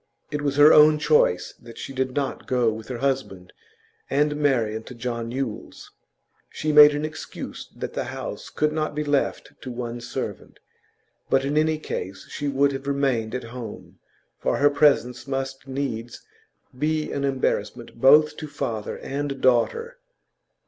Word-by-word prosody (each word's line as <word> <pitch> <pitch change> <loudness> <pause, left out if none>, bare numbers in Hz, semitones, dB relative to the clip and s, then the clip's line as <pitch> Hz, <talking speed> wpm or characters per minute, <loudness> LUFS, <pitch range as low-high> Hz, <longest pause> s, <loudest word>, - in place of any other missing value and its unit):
It 150 - -2
was 140 -1 -1
her 145 +2 +8
own 150 0 +7
choice 90 - +2
that 115 - -12
she 135 - -7
did 130 -1 -2
not 140 -2 -3
go 125 -3 +2
with 110 0 -9
her 125 - -4
husband 125 -9 -2 0.6
and 150 +2 +2
Marian 120 -7 +1
to 125 - -10
John 115 -1 -4
Yule's. 125 -3 -5 0.6
She 155 - -2
made 150 0 +9
an 150 +1 -2
excuse 155 +1 -7
that - - -5
the - - -2
house - - -6
could 150 0 0
not 155 -1 -2
be 150 - -1
left 145 -2 -1
to 130 - -7
one 120 -1 -5
servant; 120 - -6 0.7
but 135 0 +2
in 145 +2 -1
any 155 0 +2
case 95 -10 -6
she 145 - -3
would 140 0 +2
have 135 0 -6
remained 130 -5 0
at 125 - -3
home, 120 -4 -9 0.4
for - - 0
her 145 0 +4
presence 140 -4 +2
must 135 0 -4
needs 125 -4 -4 0.5
be 155 +3 -1
an 140 - -2
embarrassment 125 -4 -1
both 150 +3 +6
to 155 - -6
father 110 -7 -4
and 140 0 -4
daughter. 460 - +1
135 Hz, 160 wpm, -24 LUFS, 120-150 Hz, 0.7 s, made